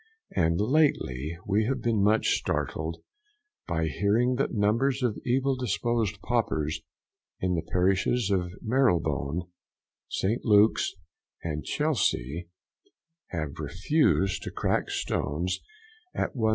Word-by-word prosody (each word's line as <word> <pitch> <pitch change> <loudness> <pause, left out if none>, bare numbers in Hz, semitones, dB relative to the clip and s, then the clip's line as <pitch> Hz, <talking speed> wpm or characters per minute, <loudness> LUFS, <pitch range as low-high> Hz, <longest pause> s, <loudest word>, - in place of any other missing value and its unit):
And 85 0 +2
lately 100 - +1
we 105 +2 +2
have 135 +3 0
been 115 -3 +2
much 110 +2 +3
startled 80 +1 -2 0.6
by 80 -1 0
hearing 100 - +2
that 135 - 0
numbers 120 +6 +1
of 115 -4 0
evil 135 +2 +1
disposed 115 -3 -1
paupers 80 -11 0 0.6
in 90 -1 0
the 85 - 0
parishes 95 +5 +2
of 90 -2 +1
Marylebone, 85 - +1 0.7
St. 110 +6 -1
Luke's 105 -2 +4 0.5
and 75 -2 -3
Chelsea, 90 - 0 0.8
have 75 -5 -4
refused 95 - +1
to - - -5
crack - - 0
stones 80 +7 -1 0.6
at - - -1
1s. 110 -4 +1
100 Hz, 110 wpm, -28 LUFS, 85-120 Hz, 0.8 s, Luke's